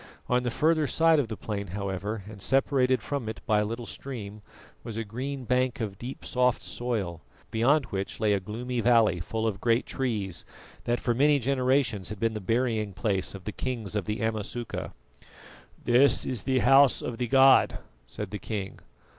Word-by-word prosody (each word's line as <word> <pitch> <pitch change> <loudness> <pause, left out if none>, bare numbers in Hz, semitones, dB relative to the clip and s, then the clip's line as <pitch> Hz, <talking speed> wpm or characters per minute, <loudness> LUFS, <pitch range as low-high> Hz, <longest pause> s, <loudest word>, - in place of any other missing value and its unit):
On 125 0 +2
the 125 - -1
further 155 +4 +2
side 160 +2 +4
of 135 - 0
the 110 -1 -6
plain, 100 -2 -4
however, 100 +2 -3
and 105 -2 -10
separated 130 +1 +2
from 140 -6 -3
it 110 - -6
by 110 -3 +3
a 105 - +1
little 115 +2 -5
stream, 110 -6 -7 0.4
was 115 -1 -6
a 115 - -1
green 130 +5 -5
bank 125 0 0
of 100 -4 -4
deep 125 +3 -7
soft 125 -1 +1
soil, 105 -9 -3 0.3
beyond 130 +6 +3
which 95 0 -4
lay 105 -2 +2
a 100 - +1
gloomy 120 +6 -4
valley 115 -6 +4
full 110 +6 -3
of 100 -4 -2
great 115 +1 +2
trees, 105 -9 -2 0.4
that 120 0 0
for 120 - 0
many 145 +4 +4
generations 130 -5 +1
had 105 -1 -7
been 115 +1 0
the 110 - -5
burying 110 0 0
place 95 0 -1
of 95 - -10
the 105 - -4
kings 115 -4 -4
of 105 -4 -1
the 105 +2 -3
Amasuka. 110 +1 -3 0.9
"This 125 +4 +5
is 125 -6 -2
the 130 -1 +1
house 135 +1 +6
of 115 -2 -5
the 125 - -1
god," 135 +1 +5 0.3
said 105 +6 -6
the 105 - -4
king. 100 -4 -5
115 Hz, 185 wpm, -27 LUFS, 105-130 Hz, 0.9 s, house